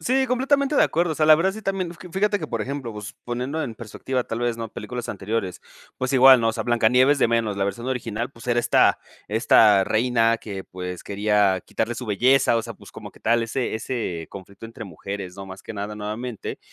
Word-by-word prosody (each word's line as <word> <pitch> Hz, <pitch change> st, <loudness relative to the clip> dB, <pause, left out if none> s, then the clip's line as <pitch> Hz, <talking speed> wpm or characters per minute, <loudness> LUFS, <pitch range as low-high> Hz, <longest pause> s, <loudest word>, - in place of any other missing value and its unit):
Sí, 265 Hz, +10 st, +1 dB
completamente 275 Hz, +3 st, +1 dB
de -, -, +6 dB
acuerdo. 170 Hz, 0 st, 0 dB
O -, -, -4 dB
sea, 155 Hz, 0 st, +1 dB
la 155 Hz, -, +9 dB
verdad 185 Hz, +5 st, +1 dB
sí, 220 Hz, +2 st, -9 dB
también 190 Hz, -3 st, -2 dB, 0.2 s
Fíjate 205 Hz, +2 st, +1 dB
que, 155 Hz, -, -5 dB
por 115 Hz, -5 st, -3 dB
ejemplo, 135 Hz, -3 st, -5 dB
pues, 105 Hz, +1 st, -8 dB
poniendo 125 Hz, +6 st, -3 dB
en 115 Hz, -4 st, -5 dB
perspectiva, 125 Hz, +3 st, -4 dB
tal 115 Hz, -, -4 dB
vez, 120 Hz, -1 st, 0 dB
¿no?, 115 Hz, -1 st, -5 dB
películas 120 Hz, +3 st, -6 dB
anteriores. 100 Hz, -2 st, -3 dB, 0.4 s
Pues, 130 Hz, +1 st, -2 dB
igual, 130 Hz, -1 st, +8 dB
¿no?, 115 Hz, -, +2 dB
o -, -, +1 dB
sea, -, -, -3 dB
Blanca 120 Hz, -2 st, +2 dB
Nieves 130 Hz, +4 st, +4 dB
de -, -, +4 dB
menos 115 Hz, -3 st, 0 dB
la 100 Hz, -, 0 dB
versión 110 Hz, +5 st, -4 dB
original, 120 Hz, -2 st, -3 dB
pues, 115 Hz, -2 st, -14 dB
era 120 Hz, -1 st, +2 dB
esta -, -, +3 dB, 0.3 s
esta 105 Hz, -2 st, +5 dB
reina 115 Hz, 0 st, +2 dB
que, 100 Hz, -4 st, -7 dB
pues, 90 Hz, -1 st, -7 dB
quería 100 Hz, -2 st, +1 dB
quitarle 120 Hz, +2 st, -2 dB
su 125 Hz, -, -7 dB
belleza. 125 Hz, +4 st, +3 dB
O 115 Hz, -, 0 dB
sea, -, -, -8 dB
pues, -, -, -16 dB
como -, -, -9 dB
que -, -, -21 dB
tal 115 Hz, +1 st, +2 dB
ese 120 Hz, +1 st, -2 dB
ese 110 Hz, -8 st, -4 dB
conflicto 100 Hz, +3 st, -10 dB
entre 115 Hz, 0 st, -9 dB
mujeres, 95 Hz, +1 st, -7 dB
¿no?, 95 Hz, 0 st, -8 dB
más 95 Hz, 0 st, -10 dB
que -, -, -8 dB
nada 105 Hz, +1 st, -5 dB
nuevamente. 110 Hz, +2 st, -5 dB
115 Hz, 220 wpm, -23 LUFS, 105-130 Hz, 0.4 s, la